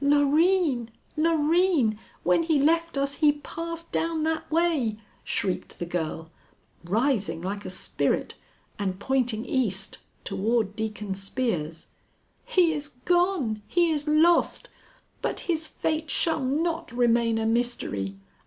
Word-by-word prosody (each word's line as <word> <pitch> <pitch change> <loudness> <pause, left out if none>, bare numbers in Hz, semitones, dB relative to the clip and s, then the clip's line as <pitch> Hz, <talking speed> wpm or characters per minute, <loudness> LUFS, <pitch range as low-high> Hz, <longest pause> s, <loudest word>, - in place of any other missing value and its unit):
"Loreen! 290 -2 +3 0.3
Loreen! 315 - +3 0.2
When 180 - +3
he 325 -2 +2
left 330 +2 +2
us 275 0 0
he 300 -2 +5
passed 335 +3 -7
down 325 -1 0
that 320 0 -1
way!" 315 -10 +1 0.3
shrieked 185 - -2
the 175 - -3
girl, 165 -1 -4 0.5
rising 205 - +1
like 200 +4 -4
a - - -4
spirit - - -1 0.5
and 190 -2 -2
pointing 245 -2 0
east 200 -7 -1 0.2
toward 220 -1 0
Deacon 210 -2 -3
Spear's. 190 -6 -2 0.6
"He 365 -9 +3
is 295 -1 -4 0.2
gone! 350 - +2
He 345 -1 +3
is 295 -1 -2
lost! 325 +3 +3 0.5
But - - -2
his 320 -2 -1
fate 315 0 -2
shall 320 -4 +1
not 325 +4 -1
remain 235 -1 +2
a 225 - 0
mystery. 225 - -1
275 Hz, 125 wpm, -26 LUFS, 215-325 Hz, 0.6 s, he